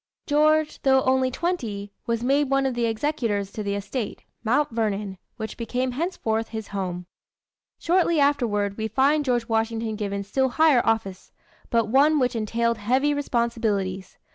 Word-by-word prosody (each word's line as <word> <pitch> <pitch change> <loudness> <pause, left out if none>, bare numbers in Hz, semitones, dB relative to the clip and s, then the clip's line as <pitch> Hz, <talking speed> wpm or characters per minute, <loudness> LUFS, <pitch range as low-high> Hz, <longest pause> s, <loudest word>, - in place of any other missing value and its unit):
George, 305 +1 +2
though 265 -1 +4
only 260 0 +2
twenty, 235 - -3 0.2
was 230 0 -1
made 275 +2 +2
one 275 0 +2
of 265 - 0
the 240 -1 0
executors 225 -5 -1
to 215 - -5
the 200 -1 -2
estate, 200 +3 -4 0.2
Mount 270 +6 +1
Vernon, 210 -4 -2 0.2
which 220 -1 -6
became 250 +2 -2
henceforth 245 -7 -2
his 220 -2 -6
home. 180 -3 -4 0.7
Shortly 340 -2 +2
afterward, 225 -8 +1
we 220 - -1
find 275 +7 +2
George 240 -4 0
Washington 225 0 -1
given 200 -1 -3
still 265 +6 0
higher 300 -2 +4
office, 215 -4 -2 0.4
but 230 -2 +2
one 285 +7 +4
which 250 -3 +1
entailed 230 +1 0
heavy 260 +7 +2
responsibilities. 225 -8 -1
235 Hz, 150 wpm, -24 LUFS, 215-275 Hz, 0.7 s, though